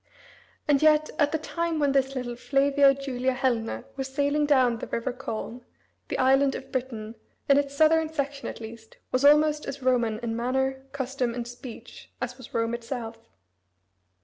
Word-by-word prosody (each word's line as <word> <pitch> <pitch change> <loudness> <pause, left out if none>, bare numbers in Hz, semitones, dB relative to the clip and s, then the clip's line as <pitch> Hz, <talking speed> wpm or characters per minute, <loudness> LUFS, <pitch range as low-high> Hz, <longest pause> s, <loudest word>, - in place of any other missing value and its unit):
And 285 -2 +3
yet 310 0 +4
at 290 -1 +3
the 315 - +1
time 335 +1 -2
when 290 -2 +2
this 270 0 +1
little 245 -2 -3
Flavia 275 +2 +3
Julia 260 -1 -1
Helena 250 -3 -1
was 270 -1 -3
sailing 285 +2 +1
down 255 -5 +3
the - - -6
river 245 +2 -2
Colne, 245 -1 -6 0.4
the - - -3
island 270 +1 +4
of - - -8
Britain, 230 -4 -4 0.3
in 280 0 +6
its 280 0 -3
southern 315 +1 +4
section 280 -2 -3
at - - -6
least, 225 0 -11
was 255 +1 +1
almost 300 +1 +5
as 275 -1 -6
Roman 240 -4 +2
in 225 -1 -2
manner, 265 +3 -1
custom, 265 -3 -2
and 240 -1 -4
speech 240 -1 -10
as 245 0 -4
was 250 - -11
Rome 230 0 0
itself. 230 -1 -6
265 Hz, 170 wpm, -26 LUFS, 240-285 Hz, 0.4 s, in